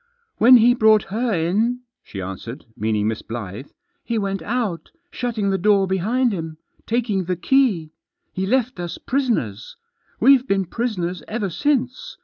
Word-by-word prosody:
"When 250 Hz, +2 st, +8 dB
he 240 Hz, +1 st, +5 dB
brought 220 Hz, -3 st, +4 dB
her 235 Hz, +2 st, 0 dB
in,* 210 Hz, +8 st, 0 dB, 0.2 s
she 95 Hz, -2 st, -7 dB
answered 105 Hz, +8 st, -7 dB
— -, -, -50 dB
meaning 105 Hz, 0 st, 0 dB
Miss 110 Hz, 0 st, -2 dB
Blyth 110 Hz, +2 st, -7 dB
— 355 Hz, 0 st, -50 dB
" 355 Hz, -, -49 dB
he 235 Hz, -, -2 dB
went 195 Hz, -3 st, -2 dB
out, 205 Hz, -5 st, -3 dB, 0.2 s
shutting 220 Hz, -5 st, -2 dB
the 195 Hz, -, 0 dB
door 200 Hz, +1 st, +3 dB
behind 215 Hz, +6 st, +1 dB
him, 160 Hz, -3 st, -5 dB, 0.3 s
taking 220 Hz, -5 st, 0 dB
the 180 Hz, +1 st, -1 dB
key. 195 Hz, -, +2 dB, 0.4 s
He 190 Hz, +1 st, -2 dB
left 255 Hz, -1 st, 0 dB
us 175 Hz, -1 st, -5 dB
prisoners. 225 Hz, -, -2 dB, 0.4 s
We've 270 Hz, -1 st, +5 dB
been 195 Hz, -1 st, +1 dB
prisoners 180 Hz, -5 st, -3 dB
ever 210 Hz, -4 st, -3 dB
since. 270 Hz, -, -1 dB
200 Hz, 160 wpm, -21 LUFS, 165-245 Hz, 0.4 s, When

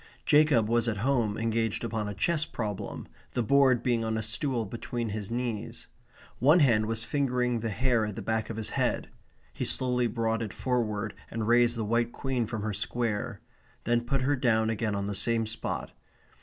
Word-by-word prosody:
Jacob 150 Hz, -7 st, +5 dB
was 120 Hz, +1 st, +2 dB
at 110 Hz, -3 st, 0 dB
home 120 Hz, -7 st, +1 dB
engaged 115 Hz, -1 st, 0 dB
upon 105 Hz, -1 st, -2 dB
a 100 Hz, -, -5 dB
chess 155 Hz, -, +1 dB
problem, 105 Hz, -9 st, -5 dB, 0.3 s
the 125 Hz, -, 0 dB
board 130 Hz, 0 st, +4 dB
being 120 Hz, -2 st, +1 dB
on 110 Hz, 0 st, -1 dB
a 110 Hz, -, -2 dB
stool 115 Hz, +1 st, -2 dB
between 115 Hz, +2 st, -4 dB
his 105 Hz, -1 st, -4 dB
knees. 120 Hz, -3 st, -3 dB, 0.5 s
One 150 Hz, +8 st, +6 dB
hand 115 Hz, -7 st, +4 dB
was 115 Hz, 0 st, -1 dB
fingering 125 Hz, -4 st, 0 dB
the 115 Hz, 0 st, -2 dB
hair 120 Hz, 0 st, +1 dB
at 105 Hz, -, -5 dB
the -, -, -6 dB
back 110 Hz, 0 st, -1 dB
of 115 Hz, -, -5 dB
his 110 Hz, -, -4 dB
head. -, -, 0 dB, 0.4 s
He -, -, -3 dB
slowly 125 Hz, -1 st, +1 dB
brought 115 Hz, -1 st, -1 dB
it 105 Hz, -4 st, -4 dB
forward 110 Hz, -4 st, -1 dB, 0.2 s
and 110 Hz, -2 st, -3 dB
raised 120 Hz, 0 st, +4 dB
the 110 Hz, -, -1 dB
white 115 Hz, +2 st, +1 dB
queen 130 Hz, -4 st, -1 dB
from 110 Hz, -2 st, -4 dB
her 110 Hz, -1 st, -2 dB
square; 110 Hz, +1 st, -2 dB, 0.4 s
then 120 Hz, 0 st, +2 dB
put 130 Hz, +2 st, -1 dB
her 145 Hz, +2 st, +2 dB
down 110 Hz, -4 st, +2 dB
again 110 Hz, -1 st, -1 dB
on 100 Hz, 0 st, -2 dB
the 100 Hz, -, -2 dB
same 115 Hz, +3 st, +1 dB
spot. 110 Hz, +1 st, -4 dB
115 Hz, 190 wpm, -29 LUFS, 110-125 Hz, 0.5 s, One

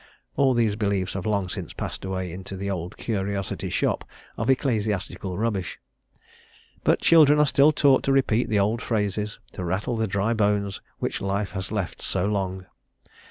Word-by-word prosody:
All 135 Hz, -2 st, +3 dB
these 115 Hz, -3 st, +2 dB
beliefs 100 Hz, -4 st, -1 dB
have 95 Hz, +1 st, -3 dB
long 100 Hz, -3 st, +1 dB
since -, -, -6 dB
passed -, -, -5 dB
away 95 Hz, -2 st, -3 dB
into 95 Hz, +2 st, -7 dB
"The 100 Hz, +1 st, -3 dB
Old 90 Hz, -1 st, -5 dB
Curiosity 100 Hz, -3 st, -2 dB
Shop" -, -, 0 dB, 0.3 s
of 115 Hz, +3 st, -2 dB
Ecclesiastical 105 Hz, -7 st, 0 dB
Rubbish, 105 Hz, -5 st, -2 dB, 1.1 s
but -, -, +3 dB
children 150 Hz, -3 st, +6 dB
are 150 Hz, -, +5 dB
still 140 Hz, +1 st, +5 dB
taught 140 Hz, -3 st, +4 dB
to 135 Hz, -, +2 dB
repeat 125 Hz, -4 st, +2 dB
the 110 Hz, -, +2 dB
old 105 Hz, +4 st, +1 dB
phrases, 105 Hz, -1 st, -1 dB
to 90 Hz, -, -6 dB
rattle 95 Hz, +7 st, -1 dB
the 110 Hz, 0 st, 0 dB
dry 100 Hz, +4 st, 0 dB
bones 105 Hz, -2 st, 0 dB, 0.2 s
which -, -, -3 dB
life 100 Hz, 0 st, -1 dB
has 95 Hz, 0 st, -4 dB
left 105 Hz, -5 st, -3 dB
so 90 Hz, -, -1 dB
long. 95 Hz, -2 st, -2 dB
100 Hz, 165 wpm, -25 LUFS, 95-115 Hz, 1.1 s, children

